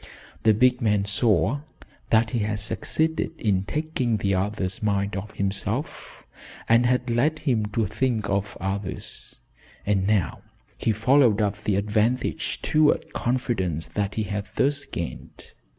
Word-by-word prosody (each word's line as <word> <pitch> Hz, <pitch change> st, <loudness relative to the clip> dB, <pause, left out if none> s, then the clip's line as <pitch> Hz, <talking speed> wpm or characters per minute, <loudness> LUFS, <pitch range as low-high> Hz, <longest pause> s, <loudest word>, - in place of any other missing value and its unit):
The 110 Hz, -1 st, +4 dB
big 125 Hz, +2 st, +3 dB
man 105 Hz, -3 st, +2 dB
saw 115 Hz, +5 st, +2 dB, 0.5 s
that 110 Hz, 0 st, +3 dB
he 120 Hz, -, 0 dB
had 105 Hz, 0 st, -1 dB
succeeded 160 Hz, +9 st, -1 dB
in 100 Hz, -4 st, +1 dB
taking 140 Hz, -5 st, -1 dB
the 100 Hz, -1 st, 0 dB
other's 95 Hz, 0 st, -1 dB
mind 100 Hz, -1 st, 0 dB
off 100 Hz, +2 st, -6 dB
himself, 100 Hz, +7 st, -3 dB, 0.4 s
and 115 Hz, +2 st, +5 dB
had 125 Hz, 0 st, +1 dB
led 135 Hz, +7 st, +2 dB
him 120 Hz, -9 st, 0 dB
to 105 Hz, +2 st, 0 dB
think 115 Hz, -5 st, -1 dB
of 100 Hz, +1 st, -2 dB
others, 95 Hz, 0 st, -5 dB, 0.5 s
and 100 Hz, -2 st, +1 dB
now 100 Hz, -10 st, +1 dB, 0.3 s
he 115 Hz, -, 0 dB
followed 115 Hz, +1 st, +4 dB
up 105 Hz, -1 st, -1 dB
the 105 Hz, -, +2 dB
advantage 110 Hz, +5 st, 0 dB
toward 155 Hz, -1 st, +2 dB
confidence 110 Hz, -, -1 dB
that 100 Hz, -1 st, -2 dB
he 110 Hz, -, 0 dB
had 100 Hz, +1 st, -4 dB
thus 140 Hz, +1 st, +1 dB
gained. 85 Hz, -1 st, -7 dB
110 Hz, 140 wpm, -25 LUFS, 100-125 Hz, 0.5 s, and